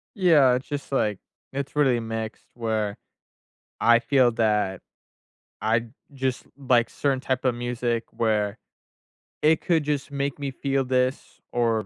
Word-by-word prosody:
Yeah, 160 - +5
it's 130 +2 -4
just 145 -1 -5
like 105 -7 +1 0.3
it's 140 +1 -4
really 135 -5 +3
mixed 115 -1 -5
where 110 -3 -2 0.8
I 115 0 +6
feel 125 +1 +3
that 105 -4 +1 0.8
I'd 115 +1 0 0.2
just 130 -2 -2
like 125 -4 +2
certain 135 -2 -1
type 130 -1 -2
of 130 -2 +2
music, 120 -1 -2
where 105 -2 0 0.9
it 155 +1 +4
could 165 -3 +2
just 145 -1 -2
make 140 0 -2
me 140 -1 -2
feel 135 0 0
this 130 +1 -1
or 115 -3 +1
125 Hz, 135 wpm, -25 LUFS, 115-140 Hz, 0.9 s, I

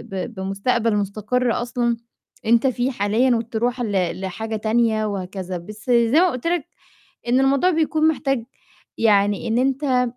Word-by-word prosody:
ب 190 +5 -4
بمستقبل 210 +4 0
مستقر 215 +5 0
أصلًا 240 -1 -1 0.5
أنت 235 +4 +4
فيه 250 +1 0
حاليًا 235 +3 +2
وتروح 235 +2 -2
ل 195 -4 -1
لحاجة 220 +4 -4
تانية 220 0 +1
وهكذا، 185 -2 -4
بس 210 +5 -11
زي 235 +5 +4
ما 365 0 +4
قُلت 255 +3 -4
لك 345 -3 0 0.6
إن 250 +2 +3
الموضوع 275 +6 +3
بيكون 315 -1 +2
محتاج 270 -6 0 0.5
يعني 205 0 +2
إن 225 +1 0
أنت 260 -1 +1
235 Hz, 140 wpm, -22 LUFS, 205-255 Hz, 0.6 s, أنت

